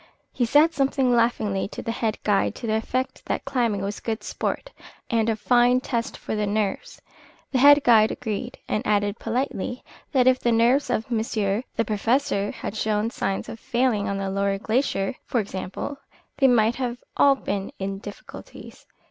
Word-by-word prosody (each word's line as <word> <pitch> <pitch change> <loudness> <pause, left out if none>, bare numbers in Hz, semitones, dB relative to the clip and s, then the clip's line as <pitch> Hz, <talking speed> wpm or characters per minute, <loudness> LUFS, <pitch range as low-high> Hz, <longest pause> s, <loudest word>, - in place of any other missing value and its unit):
He 245 - +1
said 300 +7 +4
something 270 -3 +1
laughingly 220 -5 +1
to - - -8
the 230 - -2
head 225 -2 -1
guide 205 -2 +1
to 245 - -7
the 220 - 0
effect 255 +4 -2
that - - -2
climbing 230 -6 0
was 200 +1 -4
good 225 -1 -4
sport - - -3 0.4
and 230 -1 +2
a 225 - +1
fine 245 +3 +3
test 235 -2 -3
for - - -5
the 210 -1 -1
nerves. 205 -1 -2 0.5
The 260 - +1
head 285 +2 +7
guide 220 -2 +6
agreed, 215 -4 -4
and 210 - 0
added 205 0 +1
politely 245 0 -3 0.3
that 260 -3 +3
if 255 0 +4
the 240 - +1
nerves 235 +5 +3
of 225 +3 -2
monsieur 220 -2 0
the 230 - +1
Professor 215 0 0
had 200 - -6
shown 215 +1 0
signs 195 - -2
of 225 - -8
failing 235 -5 0
on 200 - -2
the 195 -1 -2
lower 195 0 0
glacier, 220 0 0
for 240 - -1
example, 200 +7 -5 0.4
they 270 - +6
might 235 0 +3 0.3
all 280 -1 +5
have - - -19
been 200 -1 -2
in 195 0 -4
difficulties. 205 0 -11
225 Hz, 175 wpm, -24 LUFS, 205-250 Hz, 0.5 s, head